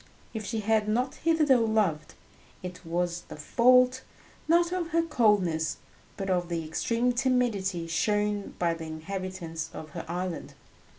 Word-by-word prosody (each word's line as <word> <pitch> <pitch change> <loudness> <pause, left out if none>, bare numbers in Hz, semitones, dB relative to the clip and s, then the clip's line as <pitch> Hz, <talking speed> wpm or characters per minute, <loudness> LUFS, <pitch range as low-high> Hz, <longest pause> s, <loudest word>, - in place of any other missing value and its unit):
If 220 -2 -4
she 225 0 -2
had 215 0 +2
not 250 +5 0
hitherto 310 -5 +3
loved, 205 -9 0 0.5
it 180 0 -7
was 175 +1 -1
the - - -8
fault, 250 +9 +4 0.5
not 340 +1 +4
of 360 -2 -1
her 335 0 +1
coldness 205 - +2 0.4
but 195 - -3
of 180 -2 0
the 165 -2 -2
extreme 230 +9 0
timidity 235 -9 +1
shown 205 +4 0
by 170 -1 +1
the 165 -1 -7
inhabitants 165 0 -5
of 155 - -7
her - - -6
island. 175 0 -4
200 Hz, 140 wpm, -28 LUFS, 170-250 Hz, 0.5 s, fault